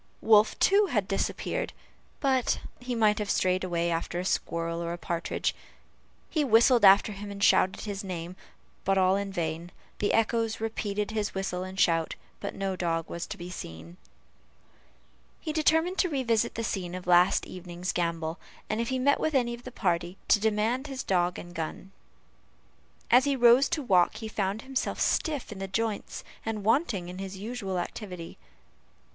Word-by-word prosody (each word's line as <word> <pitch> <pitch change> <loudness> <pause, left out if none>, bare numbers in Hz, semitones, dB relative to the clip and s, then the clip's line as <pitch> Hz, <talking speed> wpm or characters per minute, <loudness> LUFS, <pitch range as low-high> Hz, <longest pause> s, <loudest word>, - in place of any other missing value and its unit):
Wolf, 215 -1 +5
too, 400 +1 +4
had 210 - 0
disappeared, 195 - -2 0.5
but 265 -3 +2 0.2
he 245 0 -4
might 215 -2 +3
have 210 -1 -3
strayed 185 -1 +1
away 170 -2 0
after 165 +1 -2
a 180 - -3
squirrel 170 -2 -1
or 170 0 -3
partridge. 170 -1 -2 0.7
He 310 - 0
whistled 235 -1 +5
after 200 +2 +7
him 205 0 -7
and 200 0 -5
shouted 185 - +4
his 205 -1 -5
name, 180 -2 -5 0.5
but 195 0 +2
all 185 0 +4
in 200 0 -2
vain; 170 -1 -3 0.3
the 205 - +1
echoes 225 0 +1
repeated 210 -2 -2
his 210 -2 -2
whistle 190 -2 -2
and 185 +1 -7
shout, 165 -3 +2 0.2
but 200 - -5
no 195 -1 -2
dog 165 -2 -1
was 170 - -4
to - - -6
be 175 +1 -7
seen. 165 - -8 1.4
He 310 - -4
determined 320 +4 +2
to 365 - +3
revisit 235 -5 0
the 230 - -2
scene 185 -5 -3
of 185 - -6
the 180 - -1
last 175 +1 +5
evening's 180 0 -5
gambol, 170 -1 -2 0.3
and 215 +2 0
if 235 - -2
he 260 - 0
met 280 +3 +3
with 315 -2 0
any 240 -2 +2
of 235 +1 -10
the 255 - -7
party, 175 -4 -1
to 210 - +6
demand 220 +6 0
his 270 -2 -5
dog 180 -1 +1
and 175 0 -9
gun. 165 +3 -5 1.2
As 250 +3 +6
he 280 -1 +2
rose 245 +2 +6
to 300 - -1
walk, 185 -5 +3
he 220 0 -6
found 205 0 -2
himself 265 -1 -2
stiff 295 -8 0
in 205 - -7
the 195 - -4
joints, 215 +2 -3 0.2
and 220 -2 -3
wanting 225 - +1
in 180 +1 -8
his 195 0 -6
usual 200 -2 -4
activity. 180 -1 -6
200 Hz, 175 wpm, -28 LUFS, 180-235 Hz, 1.4 s, after